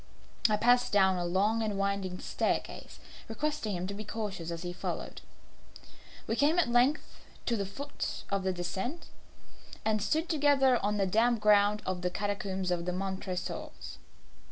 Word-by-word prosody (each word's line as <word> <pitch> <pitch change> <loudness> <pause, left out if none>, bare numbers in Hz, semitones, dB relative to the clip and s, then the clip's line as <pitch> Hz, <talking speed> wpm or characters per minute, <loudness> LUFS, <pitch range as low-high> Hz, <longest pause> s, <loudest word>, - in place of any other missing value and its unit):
I 210 - +3
passed 245 +3 +4
down 190 -2 +4
a 175 - -1
long 200 +6 +2
and 210 -2 -1
winding 195 -2 -1
staircase, - - -2 0.3
requesting 225 -3 -2
him 175 +1 -3
to 200 - -4
be 210 +2 -6
cautious 205 -6 -4
as 170 0 -5
he 175 0 -4
followed. 180 - -5 1.0
We 225 - -1
came 295 +7 +3
at 350 - +4
length 245 +5 +2 0.3
to 235 - +1
the 200 -3 -2
foot 280 +9 -5
of 200 -1 +1
the 190 0 0
descent, 190 - -4 0.8
and 215 -1 +2
stood 315 - 0
together 280 - +3
on 210 +1 +1
the 195 - +2
damp 225 +5 +3
ground 210 0 +4
of 185 -1 -2
the 180 - 0
catacombs 195 -1 -2
of 170 -1 -1
the 180 - -1
Montresors. 190 -1 -5
205 Hz, 160 wpm, -31 LUFS, 190-240 Hz, 1.0 s, passed